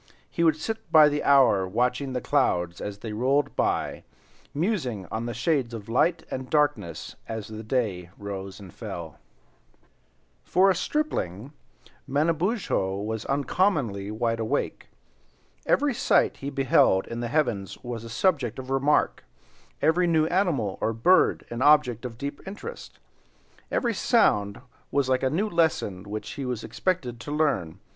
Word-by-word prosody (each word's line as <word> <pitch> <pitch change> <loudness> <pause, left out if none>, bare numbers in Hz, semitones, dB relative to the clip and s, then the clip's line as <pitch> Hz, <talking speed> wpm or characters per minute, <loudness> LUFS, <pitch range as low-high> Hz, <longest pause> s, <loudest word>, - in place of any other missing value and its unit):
He 170 - 0
would 160 -2 +4
sit 220 +8 -5
by 155 -2 +8
the 145 0 -2
hour 125 -9 +5
watching 125 +6 0
the 125 - -2
clouds 90 - 0
as 105 -1 -5
they 105 +1 -6
rolled 135 +6 +1
by, - - -1 0.5
musing 145 - -1
on 115 +2 -3
the 120 - -3
shades 120 -1 0
of 105 -3 -8
light 165 +8 +2
and 130 0 -5
darkness 145 - 0
as 110 -2 -5
the 110 0 -7
day 105 -7 -2
rose 100 -1 -6
and 95 -4 -12
fell. 80 -4 -7 1.2
For 190 +2 +4
a - - 0
stripling, 140 - -2 0.5
Manabozho 160 - 0
was 110 +2 -4
uncommonly 140 - 0
wide 115 +1 -1
awake. 110 -1 -2 0.8
Every 285 -1 +3
sight - - +2
he 140 - -5
beheld 135 -8 +3
in 115 - -6
the 120 - -2
heavens 120 -8 -1
was 120 -2 -5
a 115 - -8
subject 130 - 0
of 130 0 -7
remark, 135 +2 +2 0.6
every 175 +3 +3
new 160 -2 +3
animal 150 - 0
or 115 - +1
bird 180 +12 +3
an 120 +1 -4
object 135 -5 +4
of 115 -2 -6
deep 140 +3 -5
interest, 455 - -8
and - - -34 0.2
every 235 -2 +1
sound 105 - +2 0.3
was 140 -1 +1
like 130 -1 +2
a 130 - +2
new 190 +10 0
lesson 155 - 0
which 105 +1 -5
he 140 - -5
was 125 -3 -3
expected 140 -11 -2
to 145 - -7
learn. 140 - 0
130 Hz, 150 wpm, -26 LUFS, 110-155 Hz, 1.2 s, by